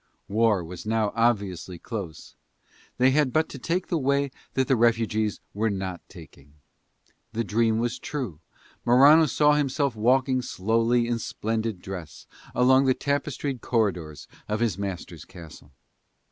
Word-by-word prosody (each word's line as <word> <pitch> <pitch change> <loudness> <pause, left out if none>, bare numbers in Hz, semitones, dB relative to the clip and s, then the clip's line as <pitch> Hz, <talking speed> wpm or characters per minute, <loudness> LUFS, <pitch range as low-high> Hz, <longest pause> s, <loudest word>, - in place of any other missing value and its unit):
War 105 -2 +2
was 85 +1 -8
now 110 -1 0
obviously 100 -7 0
close: 95 -5 -7 0.6
they 130 +1 +4
had 145 -1 +2
but 155 +3 +2
to 135 - -8
take 175 +7 -1
the 170 - -1
way 140 0 +1 0.2
that 130 -1 +1
the 135 - +3
refugees 115 -2 +1
were 110 +2 0
not 95 -3 -4
taking. 70 -5 -15 0.8
The 115 +1 -1
dream 110 +1 +1
was 120 +1 -2
true: 125 - -5 0.4
Morano 145 +6 +6
saw 150 +1 +3
himself 140 -2 0
walking 130 +3 +2
slowly 115 +3 +1
in 120 -1 -1
splendid 110 -3 -3
dress 95 -4 -8 0.3
along 130 +2 +5
the 130 -1 +3
tapestried 140 -2 -2
corridors 90 -10 -1 0.2
of 105 0 -1
his 115 -6 +1
master's 90 -4 -6
castle. 80 -4 -13
115 Hz, 140 wpm, -25 LUFS, 100-130 Hz, 0.8 s, Morano